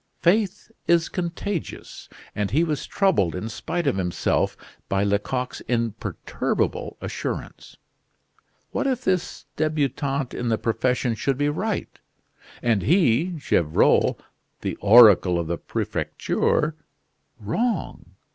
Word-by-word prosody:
Faith 205 +4 +1 0.2
is 170 -1 +3
contagious, 175 +1 -5 0.2
and 105 -1 -1
he 155 +6 +2
was 155 -4 -2
troubled 165 - +2
in 90 +4 -4
spite 170 +9 -3
of 135 -9 +1
himself 90 -2 0 0.3
by 95 0 +1
Lecoq's 105 +6 -1
imperturbable 115 -3 -2
assurance. - - -5 0.9
What - - -1
if 255 -2 -1
this 185 -2 -1
debutant 145 -3 -1
in 125 - -3
the 110 - +2
profession 125 +2 0
should 130 +4 -1
be 145 +1 +1
right, 205 +8 -3 0.6
and 115 -4 +2
he, 165 - +3
Gevrol, 85 - +2 0.4
the - - -3
oracle 100 -5 +7
of 85 - -1
the 85 +1 -3
Prefecture, 155 +1 -1 0.6
wrong! 225 - -2
135 Hz, 110 wpm, -24 LUFS, 110-170 Hz, 0.9 s, oracle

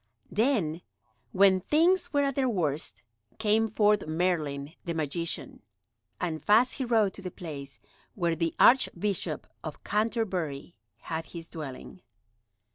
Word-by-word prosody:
Then, 205 - +1 0.5
when 190 -1 +5
things 350 - +2
were 285 -1 +2
at 275 0 +1
their 260 -1 +1
worst, 160 - -1 0.3
came 220 +1 +2
forth 210 -3 +2
Merlin 155 -4 -1
the 170 -2 -3
magician, 160 +2 -3 0.6
and 160 -3 -2
fast 225 +5 +4
he 260 - 0
rode 220 -5 +3
to - - -9
the 185 - -5
place 145 -7 -8 0.4
where 170 -4 0
the 165 0 -1
Archbishop 195 - +3 0.2
of 155 -2 -7
Canterbury 190 - -1 0.3
had 160 0 -4
his 165 -1 -9
dwelling. 155 +3 -8
180 Hz, 125 wpm, -28 LUFS, 160-220 Hz, 0.6 s, when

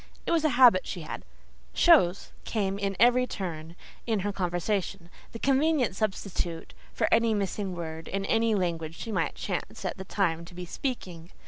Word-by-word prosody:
It - - -1
was 330 -2 +2
a 310 - +4
habit 240 -8 +7
she 180 - -5
had: 155 - -7 0.5
"chose" 200 - +4
came 200 -3 -1
in 195 -1 -1
at - - -7
every 250 +1 +5
turn 165 -6 -6 0.3
in 220 -4 +1
her 205 +1 -2
conversation—the 180 +2 -3
convenient 275 -4 +2
substitute 190 -5 -3 0.2
for - - 0
any 230 -1 +4
missing 200 -1 -2
word 160 -1 -6
in 195 0 -2
any 225 +1 +2
language 165 -4 -2
she 225 - -6
might - - -1
chance - - -4
at - - -2
the 190 - -6
time 170 -4 0
to 175 - -13
be 180 0 -6
speaking. 175 -6 -5
195 Hz, 175 wpm, -28 LUFS, 175-225 Hz, 0.5 s, habit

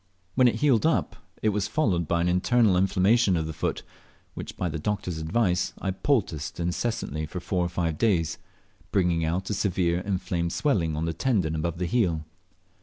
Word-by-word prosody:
When 125 +2 +5
it 120 - +2
healed 140 -6 +3
up 160 +1 +1 0.3
it 110 - +4
was 105 -1 0
followed 95 - +1
by 85 +1 +1
an 85 - +1
internal 100 +3 +3
inflammation 95 +2 +3
of 80 - -1
the 80 - -5
foot, - - -2 0.5
which - - -7
by 90 - -1
the 80 -1 -3
doctor's 90 -2 -2
advice 90 +2 0
I 95 - -1
poulticed 95 - -1
incessantly 85 -3 -2
for 90 - -5
four 90 0 -1
or 85 - -1
five 85 -3 -2
days, 85 -8 +1 0.5
bringing 90 -4 +2
out 90 +5 -1
a - - +1
severe 90 -3 +1
inflamed 90 -3 -2
swelling 90 - +1
on 80 +2 -1
the 85 - -1
tendon 90 -4 0
above 80 +1 -2
the 90 - -1
heel. 85 -7 +1
90 Hz, 185 wpm, -26 LUFS, 85-105 Hz, 0.5 s, When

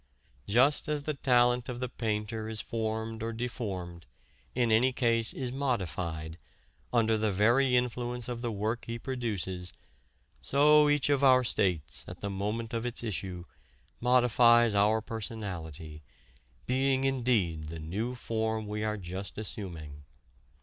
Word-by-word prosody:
"Just 130 +10 +3
as 150 -1 -1
the 155 - -2
talent 125 -3 +2
of 120 -1 -5
the 125 - -2
painter 110 -2 -3
is 110 -1 +1
formed 110 0 -3
or 115 +1 -2
deformed 95 - -5 0.5
in 120 -2 +2
any 120 +4 +4
case, 115 -2 +3
is 130 -2 -4
modified 85 - -3 0.5
under 110 -2 +2
the 110 0 +1
very 120 +7 +3
influence 125 -1 -1
of 120 -1 -4
the 120 -1 -2
work 110 +3 -2
he 115 0 -3
produces, 100 -9 -3 0.7
so 150 - +5
each 145 -1 +2
of 140 -1 +2
our 130 -1 +6
states, 90 - 0
at 90 - -9
the 100 - -4
moment 105 +4 -3
of 115 -1 -1
its 120 -1 -3
issue, 95 -5 -4 0.6
modifies 120 -2 +5
our 105 +2 +3
personality, 90 -9 -6 0.6
being 130 +1 +1
indeed 115 -12 +1
the 80 +2 -7
new 105 +11 -3
form 110 -2 -2
we 105 +1 -4
are 110 0 -1
just 95 +1 -7
assuming. 85 -9 -6
115 Hz, 140 wpm, -30 LUFS, 100-125 Hz, 0.7 s, our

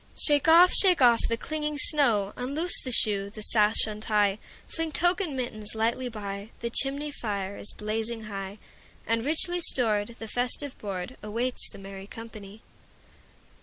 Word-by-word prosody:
Shake 290 -1 +3
off, 345 +3 +7
shake 370 -3 +5
off 240 -3 +4
the 230 - -1
clinging 300 +2 -4
snow; 235 -10 +3
Unloose 285 +8 0
the 255 - -5
shoe, 200 -4 +2
the 215 +1 -8
sash 210 0 +3
untie, 210 -1 0 0.3
Fling 325 -1 -3
tuque 355 +5 +3
and 305 -8 -3
mittens 215 -4 -3
lightly 235 +3 -1
by; 200 -2 -7
The 235 0 -4
chimney 280 +4 +1
fire 200 -6 -5
is - - -1
blazing 225 +2 -4
high, 195 -1 -7 0.5
And, 230 0 0
richly 345 +5 0
stored, 215 -9 +2
the 225 - -8
festive 250 +4 -1
boardAwaits 215 +5 -5
the - - -12
merry 195 0 -10
company. 215 -2 -11
230 Hz, 150 wpm, -26 LUFS, 210-280 Hz, 0.5 s, off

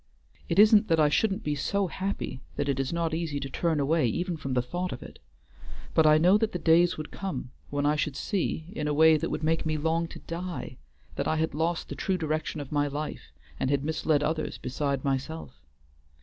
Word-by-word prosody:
It - - 0
isn't 215 +1 +7
that 165 -1 +3
I 150 -1 +5
shouldn't 200 +6 +1
be 150 - 0
so 195 +8 0
happy 190 -7 -4
that 145 - -1
it 135 -1 0
is 135 -1 -1
not 170 -1 -1
easy 160 -3 -2
to 135 - -4
turn 160 +2 0
away 150 0 +2
even 175 - -1
from 135 -4 -4
the 125 - +3
thought 175 +8 -3
of - - -6
it; - - -12 0.7
but 160 -1 +5
I 155 0 +7
know 180 +6 +5
that 225 -1 0
the - - -1
days 170 +1 +4
would 155 -1 -6
come 150 -10 -5 0.2
when 145 0 -1
I 150 +1 +3
should 150 -2 -1
see, 175 -2 -2
in 150 - -2
a 150 - 0
way 160 +1 +7
that 150 - -1
would - - -3
make 160 +1 +1
me 155 -1 -1
long 165 +2 0
to - - -10
die, 175 +1 -6 0.4
that - - -1
I - - +1
had 160 -1 0
lost 165 +3 -1
the - - -5
true 190 -1 -1
direction 155 -1 -2
of 140 -2 -7
my 145 -1 +2
life 145 - -5 0.3
and 130 - 0
had 140 -1 +1
misled 155 -1 +1
others 155 +1 -2
beside 140 +1 -2
myself. 135 - -3
155 Hz, 220 wpm, -28 LUFS, 145-170 Hz, 0.7 s, isn't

